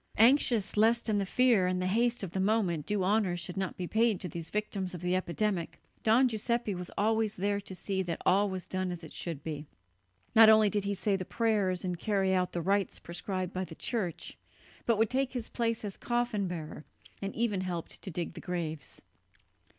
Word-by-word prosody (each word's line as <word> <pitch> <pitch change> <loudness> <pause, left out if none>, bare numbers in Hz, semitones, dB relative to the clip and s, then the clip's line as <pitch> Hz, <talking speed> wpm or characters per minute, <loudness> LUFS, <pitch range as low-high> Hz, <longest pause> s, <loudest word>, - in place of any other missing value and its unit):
Anxious 230 -3 +4
lest 230 +2 +3
in 210 -1 +2
the 195 - -1
fear 235 -5 +4
and 180 0 0
the 185 - -1
haste 235 +4 +1
of 185 - -4
the 190 - -2
moment 190 -6 +1
due 205 -2 +1
honour 195 -2 +2
should 175 +1 -6
not 190 -2 -3
be 180 - -3
paid 220 +1 +2
to 180 - -3
these 165 -1 -6
victims 200 -3 -2
of 170 - -7
the 180 +1 +1
epidemic, 185 -1 -1 0.2
Don 235 +4 +5
Giuseppe 235 -1 -1
was 180 0 -6
always 220 0 +1
there 200 +2 0
to 190 -1 -8
see 190 +1 -2
that 175 -3 -3
all 200 +2 +4
was 185 -1 -5
done 185 0 -2
as 175 -1 -5
it 160 - -9
should 160 -5 -5
be. 150 -2 -5 0.7
Not 220 0 +9
only 215 -2 +6
did 205 -2 -1
he 200 0 0
say 195 +2 0
the 190 - -2
prayers 200 -4 0
and 180 -2 -2
carry 195 -2 +1
out 180 -1 +1
the 170 - -3
rites 195 +1 +1
prescribed 185 +1 -4
by 185 - -2
the 170 -3 -8
Church, 190 -7 -4 0.5
but 230 -2 +3
would 220 0 +2
take 265 0 0
his 245 -3 -4
place 230 -2 -1
as 200 - -5
coffin 240 -5 0
bearer, 160 -3 -6 0.4
and 195 0 -4
even 220 -5 0
helped 175 -3 -5
to - - -7
dig 170 -1 -4
the 170 - -9
graves. 165 -4 -4
195 Hz, 210 wpm, -31 LUFS, 180-220 Hz, 0.7 s, Not